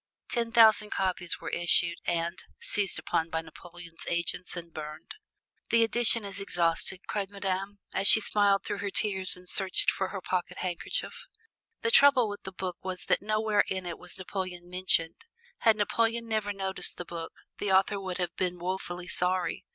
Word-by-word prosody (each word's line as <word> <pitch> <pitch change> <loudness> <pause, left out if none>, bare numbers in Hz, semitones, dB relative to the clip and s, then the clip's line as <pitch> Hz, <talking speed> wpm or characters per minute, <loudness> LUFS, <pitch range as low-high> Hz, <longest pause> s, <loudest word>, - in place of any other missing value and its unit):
Ten 235 -2 -1
thousand 220 -3 +5
copies 185 -3 0
were - - -6
issued 170 0 +2
and 170 +1 -2 0.2
seized 200 -3 +1
upon 165 0 -1
by 160 -1 -2
Napoleon's 170 0 -11
agents 175 +1 -2
and 170 -1 -9
burned. 155 0 -8 0.6
"The 230 0 +4
edition 230 -1 +2
is 200 0 -5
exhausted," 175 0 +1
cried 200 -2 -3
Madame, 195 0 -4 0.2
as 195 - +3
she 220 - +9
smiled 205 -2 +2
through 205 - -4
her 200 - -3
tears 190 -2 +5
and 180 0 -13
searched 190 +1 +4
for 190 - -2
her 195 - -6
pocket 180 -1 -3
handkerchief. 185 - -4 0.6
The 230 - +1
trouble 270 -4 +6
with 205 0 -7
the 190 - -8
book 185 -2 -5
was 185 -1 -4
that - - +1
nowhere 215 0 +1
in 190 -1 -3
it 170 -1 -6
was 180 - -5
Napoleon 185 -2 -6
mentioned. 180 - 0 0.3
Had 220 -1 +3
Napoleon 230 +2 0
never 215 -2 -1
noticed 195 -1 -2
the 180 - -6
book, 165 -1 -8 0.2
the 205 - -1
author 195 +1 +3
would 185 -2 -5
have 175 0 -3
been 180 -1 -2
woefully 180 0 -5
sorry. 180 0 0
190 Hz, 175 wpm, -28 LUFS, 175-205 Hz, 0.6 s, she